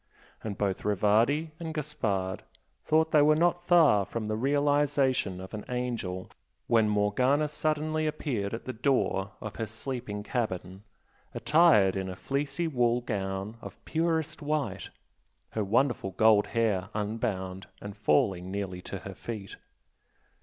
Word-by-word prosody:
And 105 -3 -4
both 100 -2 -1
Rivardi 110 - +2
and 160 -2 -5
Gaspard 105 -11 -2 0.4
thought 160 +1 +2
they 150 - +6
were 150 +1 +5
not 175 +2 +1
far 155 - +6
from 110 +2 -4
the 110 - -1
realisation 140 -5 +1
of 95 +3 -9
an 105 - -5
angel 120 -7 -3 0.3
when 110 -2 +3
Morgana 125 +9 +2
suddenly 155 +1 -1
appeared 120 -9 -2
at 115 - -9
the 130 - -4
door 110 -6 0
of 105 -1 -7
her 115 - -2
sleeping 115 -2 -5
cabin, 95 -5 -3 0.5
attired 150 - +5
in 95 -1 -2
a 90 - -5
fleecy 140 - -2
wool 120 -4 +2
gown 100 -1 -3
of - - -9
purest 160 -1 -1
white, 150 -1 -2 0.6
her 110 - -1
wonderful 115 0 +1
gold 110 +1 +5
hair 105 -5 0
unbound 100 -3 -3
and 105 -1 -8
falling 90 +4 +1
nearly 95 -2 -4
to - - -6
her - - -8
feet. 105 -5 -7
115 Hz, 140 wpm, -29 LUFS, 100-145 Hz, 0.6 s, they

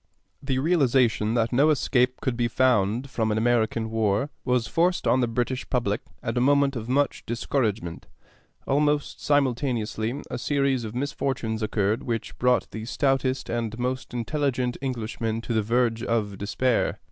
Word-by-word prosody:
The 135 -2 -1
realization 130 -7 +2
that 115 0 +1
no 140 +5 +4
escape 130 -4 +2
could 130 -3 -1
be 120 0 +1
found 120 -1 +2
from 110 -4 -1
an 105 - 0
American 115 -1 +1
war 110 +5 +1
was 125 -2 +1
forced 175 - +1
on 130 - +3
the 125 - +2
British 125 +2 -2
public 115 -5 0 0.2
at 115 - -2
a 120 - +2
moment 140 +1 +3
of 115 -1 -5
much 140 +1 +1
discouragement. 110 - -2 0.6
Almost 145 +1 0
simultaneously 125 -4 0
a 125 - -3
series 135 -3 +1
of 110 +1 -7
misfortunes 125 -4 -2
occurred 110 +2 0
which 115 -4 -4
brought 125 0 +2
the 110 0 -6
stoutest 135 +1 0
and 115 -1 -3
most 125 +1 -3
intelligent 125 0 -1
Englishmen 115 -3 -3
to 115 - -3
the 110 - +2
verge 115 +1 +1
of 110 -4 -1
despair. 120 +4 0
120 Hz, 155 wpm, -25 LUFS, 115-135 Hz, 0.6 s, no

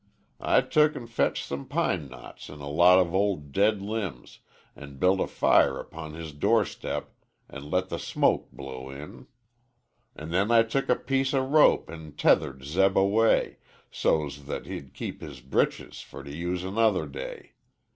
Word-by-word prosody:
I - - +3
took 150 0 +2
an' 120 - -6
fetched 115 0 -1
some 70 0 -6
pine 75 - -1
knots 65 -1 -12
an' 75 0 -10
a 70 - -7
lot 85 +5 +6
of 90 -2 +2
ol' 100 +1 +2
dead 100 +8 0
limbs, 100 - -5 0.4
An' 70 -1 -11
built 95 +6 +3
a - - 0
fire 65 - +3
upon 80 -1 -8
his 80 -2 -8
door 75 - +2
step - - -6 0.3
an' 75 0 -10
let 90 +2 0
the - - -4
smoke - - 0
blow 65 -1 -8
in; 70 +2 -10 0.9
An' 80 +2 -8
then 95 +5 +1
I 115 -1 +6
took 125 +5 -2
a 125 - +5
piece 135 +1 -1
o' 130 -1 +1
rope 150 +3 +4
an' 80 -2 -10
tethered 65 -1 +2
Zeb 95 +7 +2
away 105 +4 +3 0.3
So's 70 -2 -1
that - - -5
he'd 70 -2 -8
keep - - -6
his 70 -4 -9
breeches 65 +2 -1
fer 70 - -11
to 70 +1 -8
use 90 +2 -3
another 110 +4 +1
day. - - -8
85 Hz, 170 wpm, -27 LUFS, 70-110 Hz, 0.9 s, lot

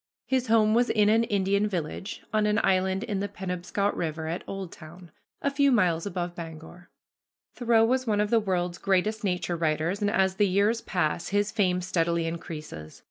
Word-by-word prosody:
His 260 -1 0
home 220 -1 +4
was 240 +2 +3
in 210 -1 +3
an 225 +2 +4
Indian 200 0 +1
village 185 +1 -5
on 215 -1 +2
an 210 +1 +2
island 190 +1 +1
in 205 -5 -2
the 200 - -1
Penobscot 190 +1 -2
River 160 -1 -3
at 170 +2 -3
Oldtown, 175 -3 -9 0.3
a 280 - +1
few 280 0 +3
miles 180 -7 +2
above 175 -3 -3
Bangor. 165 +1 -10 0.6
Thoreau 230 -2 +3
was 255 +2 0
one 210 -2 +1
of 210 0 0
the 230 - +5
world's 180 -4 -2
greatest 200 +3 0
nature 180 -3 -1
writers, 165 +4 -1
and 205 - +2
as 190 -3 +1
the 205 - +4
years 205 +5 +2
pass, 170 -2 -1
his 205 +1 0
fame 185 -5 +1
steadily 170 -2 0
increases. 155 - -7
190 Hz, 180 wpm, -27 LUFS, 175-210 Hz, 0.6 s, the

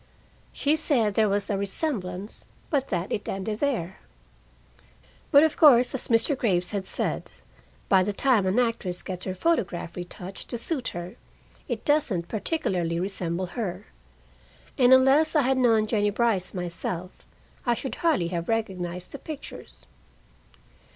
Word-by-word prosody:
She 290 +2 +1
said 250 -9 +1
there 215 0 +3
was 200 0 0
a 200 - 0
resemblance, 200 - -3 0.3
but 275 -3 +1
that 180 0 -2
it 205 - -3
ended 210 +3 -3
there. 220 - -1 1.3
But 285 -1 +7
of 315 - +2
course, 255 -5 +6
as 265 - -3
Mr. 230 +5 +2
Graves 185 -9 0
had 195 -2 -3
said, - - -2 0.6
by 190 -1 +5
the 195 +3 0
time 215 -2 +2
an 190 +5 +1
actress 230 -7 -1
gets 185 -1 -5
her 185 - -3
photograph 180 - -1
retouched 180 +1 -8
to 240 - -3
suit 265 +2 -2
her, 175 +1 -6 0.5
it - - -4
doesn't 235 - +1
particularly 180 - -1
resemble 185 -1 -2
her. 205 -7 -4 0.9
And 250 -1 +4
unless 270 +5 +5
I 300 - +5
had 260 +1 +2
known 225 -4 +4
Jennie 210 -2 +1
Brice 210 -3 0
myself, 180 0 -4 0.6
I 240 - +3
should 265 - -5
hardly 310 - +2
have 170 -1 -4
recognized 180 -5 -2
the 280 - -7
pictures. 310 -3 -9
210 Hz, 145 wpm, -26 LUFS, 180-260 Hz, 1.3 s, But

